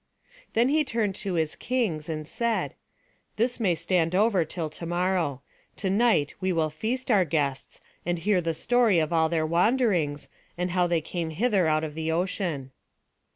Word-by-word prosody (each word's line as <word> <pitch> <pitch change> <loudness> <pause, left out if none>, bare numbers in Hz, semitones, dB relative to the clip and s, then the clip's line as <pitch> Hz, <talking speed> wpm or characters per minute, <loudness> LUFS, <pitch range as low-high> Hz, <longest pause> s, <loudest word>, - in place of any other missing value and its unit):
Then 235 +3 +3
he 305 +2 +3
turned 225 -7 -1
to 195 -4 -3
his 160 -2 0
kings, 210 -12 -2
and 155 -1 -4
said: 235 +3 -1 0.6
"This 240 +3 0
may 190 -7 +2
stand 170 0 0
over 200 -3 +3
till 160 +1 -4
to 155 +2 -8
morrow. 175 -6 0 0.3
To 190 -3 -2
night 205 -9 +3
we 185 0 +1
will 160 -3 0
feast 240 - -2
our 200 -4 +5
guests, 140 -4 -2 0.2
and 175 +1 -1
hear 185 +2 +1
the 165 -1 -2
story 240 -1 +3
of 160 0 +1
all 160 -1 +3
their 160 -1 +1
wanderings, 175 - +1 0.3
and 180 +1 -1
how 180 0 +2
they 170 -2 +1
came 165 +1 -4
hither 190 +1 +1
out 155 0 +2
of 155 -1 -4
the 160 +1 -2
ocean." 165 -6 -2
175 Hz, 175 wpm, -26 LUFS, 160-210 Hz, 0.6 s, our